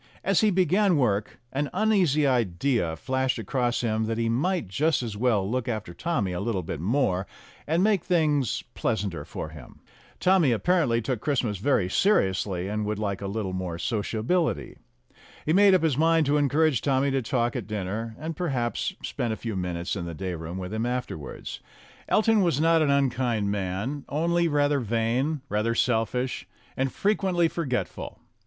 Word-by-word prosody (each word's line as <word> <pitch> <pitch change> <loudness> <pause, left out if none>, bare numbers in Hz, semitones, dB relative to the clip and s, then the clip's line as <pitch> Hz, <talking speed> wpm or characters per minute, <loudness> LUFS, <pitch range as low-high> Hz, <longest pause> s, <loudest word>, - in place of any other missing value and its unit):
As 195 -1 +3
he 215 - +4
began 185 0 +3
work, 105 -6 0
an 140 +1 -1
uneasy 185 -9 +3
idea 115 -6 +1
flashed 130 +8 -1
across 120 +2 -1
him 110 -2 0
that 115 0 -2
he 115 0 0
might 160 - 0
just 145 - +1
as 110 -3 -4
well 105 -4 +1
look 125 +2 -2
after 110 -7 -3
Tommy 120 - -1
a 90 - -3
little 100 -3 -1
bit 80 - -5
more, 95 - 0 0.4
and 165 +4 +2
make 205 -4 +2
things 150 - +1
pleasanter 100 -9 -2
for 75 - -6
him. 75 -5 -13 0.4
Tommy 180 -7 +4
apparently 120 -2 +2
took 120 -2 -2
Christmas 120 -9 0
very 105 -5 +2
seriously, 95 - +1
and 105 +1 -2
would 105 0 -2
like 100 -2 -2
a 100 - -3
little 100 -2 -3
more 90 -2 -3
sociability. 115 - -1 0.7
He 155 - +2
made 195 +1 +6
up 180 - +2
his 150 -4 +1
mind 165 0 +4
to 145 +2 +2
encourage 145 -1 +2
Tommy 140 0 +1
to 135 0 +1
talk 120 +1 0
at 120 -6 -4
dinner, 110 +2 -4
and, 160 +1 -5
perhaps, 130 -9 -2
spend 115 -2 -2
a - - -5
few 115 -3 -4
minutes 90 0 -2
in 85 -3 -4
the 85 -1 -6
day 95 +1 -4
room 85 +2 -6
with 95 +2 -5
him 110 +2 -1
afterwards. 120 - -5 0.5
Elton 220 0 +3
was 170 -7 +2
not 165 +1 +4
an 150 - +2
unkind 125 -6 +1
man, 100 +8 -3
only 170 +3 +1
rather 145 -2 +2
vain, 120 +6 0
rather 110 +1 0
selfish, 125 +2 0 0.3
and 135 0 0
frequently 190 -4 +1
forgetful. 145 -7 -3
125 Hz, 170 wpm, -26 LUFS, 105-155 Hz, 0.7 s, made